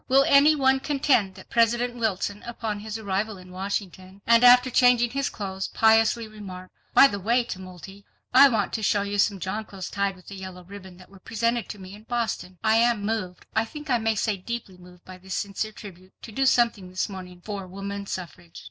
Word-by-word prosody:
Will 270 +1 +5
any 285 +2 +6
one 265 -2 +3
contend 265 -9 +1
that - - -14
President 240 +1 +2
Wilson 205 -3 -2
upon 225 -3 -5
his 215 +1 -6
arrival 205 0 -2
in 185 0 -14
Washington, 190 0 -5
and 235 +1 +5
after 250 +1 +7
changing 240 -1 +4
his 275 +1 -1
clothes, 190 -2 -5
piously 225 +1 +3
remarked: 190 -4 -10 0.2
"By - - +9
the 205 -7 +1
way, 235 +6 +2
Tumulty, 190 -1 -9 0.3
I 275 +2 +8
want 215 -5 -1
to 220 - -2
show 205 -1 +1
you 205 0 -3
some 200 -1 +2
jonquils 195 +1 -5
tied 200 -1 -1
with 185 +1 -15
a - - -7
yellow 185 -1 -9
ribbon 190 -1 -12
that 185 +1 -17
were 195 - -15
presented 230 +3 -1
to - - -6
me 190 0 -11
in 210 +1 -13
Boston. 225 -6 -3
I 220 0 +4
am 230 -3 +2
moved, 205 -5 -3
I 220 - +3
think 295 +5 -8
I 245 - +3
may 225 0 0
say 210 -1 0
deeply 195 -2 -7
moved 180 0 -17
by 185 0 -11
this 190 0 -6
sincere 205 +2 -3
tribute, 190 -3 -13
to 230 - -9
do 270 +5 +1
something 230 -7 +2
this 185 0 -2
morning 185 -3 -9
for 195 0 -6
woman 200 +1 -6
suffrage. 130 - -8
205 Hz, 205 wpm, -25 LUFS, 190-235 Hz, 0.3 s, By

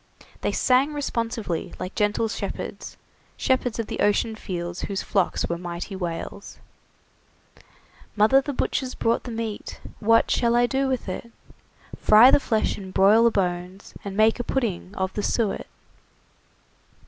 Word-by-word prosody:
They - - 0
sang 265 +4 +2
responsively, 230 - -3
like 185 - -5
gentle 210 +2 +1
shepherds 220 - -6 0.4
shepherds 255 -3 0
of 230 - -2
the - - -6
ocean 210 +2 +2
fields 175 -4 -5
whose 195 -1 -3
flocks 195 -4 0
were 170 0 -3
mighty 175 +2 -6
whales: 180 +2 -6 1.6
"Mother, 220 +6 +5
the 285 - -4
butcher's 260 -1 -2
brought 230 +1 0
the 245 - -5
meat, 225 -2 -5 0.2
What 230 +1 +3
shall 235 -1 +2
I 240 0 +4
do 270 +2 0
with 260 -5 -2
it? 235 +5 -6 0.7
Fry 220 +5 +7
the - - +6
flesh, 220 -6 0
and 190 -1 -8
broil 210 +5 +5
the - - +7
bones, 180 -2 -3
And 200 -1 -6
make 220 +2 +4
a - - -1
pudding 210 -7 -2
of 190 0 -2
the 210 - -2
su 215 -1 +1
et." - - -7
215 Hz, 150 wpm, -24 LUFS, 190-240 Hz, 1.6 s, Fry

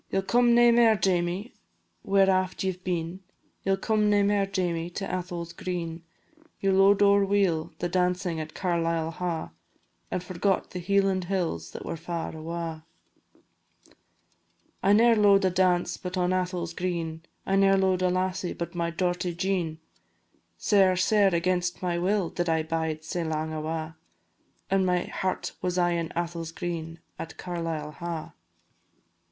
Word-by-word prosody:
"Ye - - -1
'll 195 - +1
come 240 +3 +4
nae 240 0 +7
mair, 230 -2 +5
Jamie, 185 +2 0 0.5
where 195 0 +3
aft 185 -1 +1
ye 190 - +1
've 185 0 -13
been, 175 0 -2 0.4
Ye 195 - +1
'll - - +1
come 215 +1 +1
nae 205 -1 +4
mair, 200 -1 +2
Jamie, 175 -3 -1
to 195 +3 -5
Atholl's 175 -2 -4
green; 170 -2 -4 0.6
Ye 195 - +1
lo'ed 195 +1 +5
ower 200 0 +5
weel 195 -5 +1
the 175 - -1
dancin' 180 -1 0
at 155 0 -7
Carlisle 165 -3 0
Ha', 165 -1 -3 0.6
And 180 - -2
forgot 185 +2 -1
the 180 - -5
Hieland 195 0 +1
hills 170 - -2
that - - -7
were - - -3
far 170 0 -4
awa'." 165 0 -5 2.0
"I 200 - +4
ne'er 230 +2 +6
lo'ed 200 -2 +5
a 185 - +3
dance 180 -1 +2
but 180 0 -5
on 180 0 +1
Atholl's 180 -2 -2
green, 165 -3 -3 0.2
I 195 - +1
ne'er 195 0 +5
lo'ed 190 -1 +2
a 185 - +3
lassie 185 0 -1
but 170 0 -5
my 170 -1 -1
dorty 175 0 -1
Jean, 175 -4 -1 0.8
Sair, 195 -3 +4
sair 195 0 +3
against 175 +1 0
my 175 -1 0
will 190 0 0
did 175 -1 -2
I 160 -1 +2
bide 160 -1 -2
sae 170 +2 -3
lang 160 0 -2
awa', 155 +1 -4 0.8
And 195 0 +3
my 180 -1 +1
heart 185 -1 -3
was 180 0 -1
aye 175 -1 +3
in 170 -1 -1
Atholl's 170 -1 -3
green 165 -1 -5 0.2
at - - -7
Carlisle 165 -4 -4
Ha'." 170 -2 -5
180 Hz, 160 wpm, -27 LUFS, 170-195 Hz, 2.0 s, nae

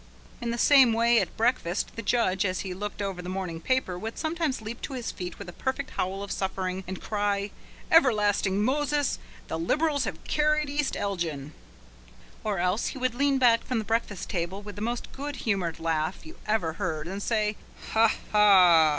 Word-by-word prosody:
In 235 - -2
the 235 - -1
same 265 -2 +6
way 235 +1 +4
at - - -3
breakfast, 225 -7 0
the 230 - -4
judge, 200 -4 +1
as 185 -2 -1
he 190 -2 -4
looked 205 +2 -5
over 195 -2 -3
the 180 - -6
morning 185 -3 -4
paper, 255 -8 0
would 225 +3 -5
sometimes 320 -4 -1
leap 220 +2 -7
to - - -5
his 250 -3 -3
feet 180 -1 -6
with - - -8
a 175 - -8
perfect 265 +5 -3
howl 190 +2 -2
of 200 - -6
suffering, 190 -1 -2
and 190 0 -5
cry: 205 -1 -1 0.4
"Everlasting 210 - +4
Moses! 290 +3 +1 0.3
the 160 - -3
Liberals 290 - +1
have - - -5
carried 300 -1 +1
East 290 -1 -1
Elgin." 165 -8 -3 0.9
Or 210 -2 -1
else 180 +5 +1
he - - -5
would 255 -2 0
lean 280 +2 +2
back 235 -3 +4
from 250 - -2
the 220 - -2
breakfast 225 -3 -1
table 185 +3 -3
with 205 0 -8
the 205 - -7
most 235 +2 -3
good 285 +1 -5
humoured 195 -9 -1
laugh 165 - -1
you 320 - -11
ever 210 -7 +1
heard 160 -3 -3
and 195 +3 -5
say: 215 -1 0 0.4
"Ha! 225 0 +5 0.2
ha! 185 -6 +7
210 Hz, 190 wpm, -27 LUFS, 185-250 Hz, 0.9 s, ha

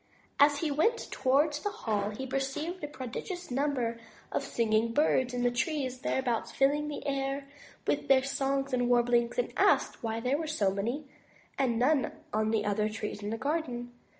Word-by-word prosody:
As 285 0 +5
he 315 -3 0
went 445 +12 +1
towards 290 +3 +2
the 415 - -2
hall 215 - -1
he 215 +5 -5
perceived 275 +6 -3
a - - -1
prodigious 295 - -6
number 250 -4 0 0.3
of - - 0
singing 230 0 +1
birds 260 -3 +3
in 245 0 -2
the 245 - +3
trees 260 0 -1
thereabouts, 250 -3 -1
filling 290 +2 +2
the 295 - -5
air 275 0 -2 0.4
with - - 0
their 265 -1 +5
songs 275 0 -1
and 245 -1 +2
warblings, 240 -1 +3
and - - 0
asked - - +3
why 225 -2 -2
there 255 +5 0
were 320 - -3
so 210 -11 +1
many 235 +10 -2 0.5
and 255 -4 +1
none 265 +3 +2 0.2
on 215 0 +1
the 220 -1 +1
other 210 +1 +1
trees 215 -1 -5
in 205 - -3
the 225 - -2
garden. 255 -3 -2
260 Hz, 180 wpm, -30 LUFS, 235-290 Hz, 0.5 s, As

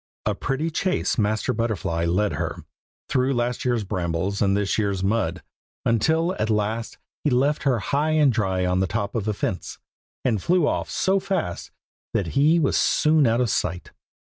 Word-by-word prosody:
A - - +1
pretty 155 +5 -2
chase 180 -4 0
Master 110 0 +1
Butterfly 105 -7 -1
led 100 +5 +1
her, - - -4 0.4
through 130 +1 +1
last 120 0 -1
year's 120 -3 +1
brambles 95 0 -2
and 100 0 +3
this 100 +1 0
year's 100 -3 -1
mud, 110 +4 0 0.4
until 160 - +2
at 110 - 0
last 110 +2 -1 0.3
he 150 - +2
left 140 +4 +2
her 130 -3 +3
high 145 +9 0
and 150 -4 +4
dry 95 -4 0
on 90 0 +1
the 95 - +1
top 100 0 -2
of 110 -3 -2
a 105 - +1
fence, 95 - -3 0.5
and 110 -6 +1
flew 175 - +2
off - - -1
so 195 +1 +1
fast 190 - -3 0.5
that 90 -5 0
he 150 +4 +4
was 155 -5 +2
soon 155 -2 +3
out 115 +2 +2
of 120 -4 +1
sight. 90 +2 -2
115 Hz, 175 wpm, -24 LUFS, 100-145 Hz, 0.5 s, and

